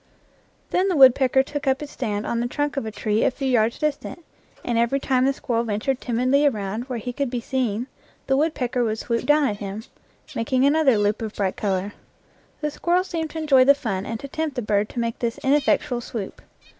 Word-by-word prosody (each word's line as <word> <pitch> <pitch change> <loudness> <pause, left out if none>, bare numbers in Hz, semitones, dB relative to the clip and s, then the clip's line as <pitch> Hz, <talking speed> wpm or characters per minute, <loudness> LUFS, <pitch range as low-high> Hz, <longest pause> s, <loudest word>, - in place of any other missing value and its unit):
Then 370 +2 +2
the 370 - +1
woodpecker 265 -1 +6
took 290 +1 -5
up 265 0 +2
his 295 -1 -7
stand 210 -5 -3
on 235 - -1
the 240 - 0
trunk 290 +3 -2
of 275 -5 -2
a - - -4
tree 215 +1 0
a - - +4
few 270 +1 -4
yards 235 -3 +2
distant, 305 +2 -3 0.4
and 240 - -1
every 235 +4 +2
time 260 -2 +1
the 275 - +3
squirrel 235 -4 -2
ventured 235 +4 -2
timidly 255 +4 +1
around 215 -2 -2
where 255 -2 -4
he 245 +2 -5
could 280 0 -2
be 245 0 -2
seen 235 -2 -2 0.4
the 270 - +2
woodpecker 270 -5 0
would 220 -1 -1
swoop 230 +1 -2
down 295 +1 +4
at 205 - -2
him, 200 +1 -6 0.5
making 260 +3 +1
another 285 -4 +4
loop 205 +1 0
of 220 -1 -5
bright 195 -2 -1
color. 195 0 -2 0.7
The 300 -1 -1
squirrel 350 +4 +1
seemed 330 -4 -4
to 325 - -8
enjoy 290 -5 +5
the 280 +2 +6
fun 205 -8 -3
and 225 -1 -4
to 280 - -6
tempt 310 0 -3
the 245 - -2
bird 210 0 +1
to - - -5
make 230 -1 -2
this 235 0 -2
ineffectual 275 -2 +2
swoop. 220 -4 -6
250 Hz, 215 wpm, -23 LUFS, 225-280 Hz, 0.7 s, woodpecker